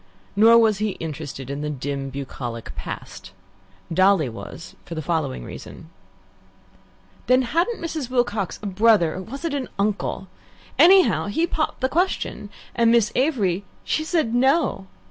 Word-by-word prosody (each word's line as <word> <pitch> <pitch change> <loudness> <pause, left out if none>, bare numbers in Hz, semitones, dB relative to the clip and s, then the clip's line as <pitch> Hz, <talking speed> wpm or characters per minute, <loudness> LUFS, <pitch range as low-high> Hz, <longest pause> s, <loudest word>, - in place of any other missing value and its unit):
Nor 225 +3 +7
was 220 -3 +4
he 215 -2 -2
interested 145 -4 -6
in 140 +1 -4
the 150 - -2
dim, 140 -1 -4
bucolic 125 -4 -6
past. - - -8 0.6
Dolly 185 -5 +4
was 115 +7 -9
for 170 - -8
the 160 - -3
following 150 - -2
reason. 160 - -10 1.4
"Then 255 +1 +4
hadn't 340 - 0
Mrs. 315 -6 -4
Wilcox 240 -6 0
a - - -5
brother 200 -4 +3
or 185 - -5
was 270 - -7
it 325 - -1
an 275 -3 -3
uncle? 200 -1 -1 0.5
Anyhow, 345 - +6
he 320 +12 +1
popped 315 -4 -2
the 260 - +3
question, 335 - -1 0.2
and 235 -1 +3
Miss 230 -2 +4
Avery, 210 - +1 0.2
she 310 - -1
said 315 -8 0
'No.' 255 - +2
205 Hz, 145 wpm, -23 LUFS, 160-260 Hz, 1.4 s, Nor